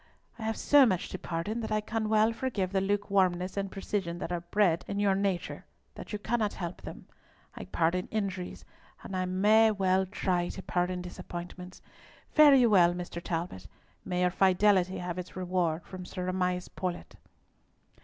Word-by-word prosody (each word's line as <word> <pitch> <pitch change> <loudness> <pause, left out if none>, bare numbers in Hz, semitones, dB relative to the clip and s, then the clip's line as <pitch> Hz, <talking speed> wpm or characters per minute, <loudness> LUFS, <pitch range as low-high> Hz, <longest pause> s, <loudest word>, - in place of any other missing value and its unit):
"I - - -8
have 220 0 -1
so 290 -1 +6
much 185 -5 -1
to 185 - -6
pardon 175 +7 -3
that 220 -2 -5
I 215 - +2
can 215 0 -3
well 220 +1 +3
forgive 220 -7 -2
the 195 -1 +1
lukewarmness 190 -2 +1
and 195 -1 -3
precision 195 -3 -3
that 175 - -5
are 175 -1 -2
so 170 - -28
bred 180 -4 +2
in 200 - -3
your 200 -1 +3
nature 195 -2 -2 0.3
that - - -10
you 210 - -2
cannot 215 0 -1
help 175 -1 -6
them. - - -9 0.5
I - - -8
pardon 170 +2 0
injuries, 190 -4 -4 0.4
and 190 - -6
I 185 0 0
may 210 +5 +4
well 190 -2 +1
try 180 -2 -1
to 190 - -7
pardon 180 0 -1
disappointments. 180 0 -8 0.5
Fare 300 -2 +7
you 245 -4 +5
well, 175 -3 +5
Mr. 175 -1 -6
Talbot; 165 - -4 0.4
may 180 -1 -2
your 180 0 +3
fidelity 190 0 +3
have 180 0 -4
its 180 - -8
reward 180 -3 -1
from 185 -1 -8
Sir 180 0 -5
Amias 180 -1 -1
Paulett." 180 -2 -5
185 Hz, 175 wpm, -29 LUFS, 180-205 Hz, 0.5 s, Fare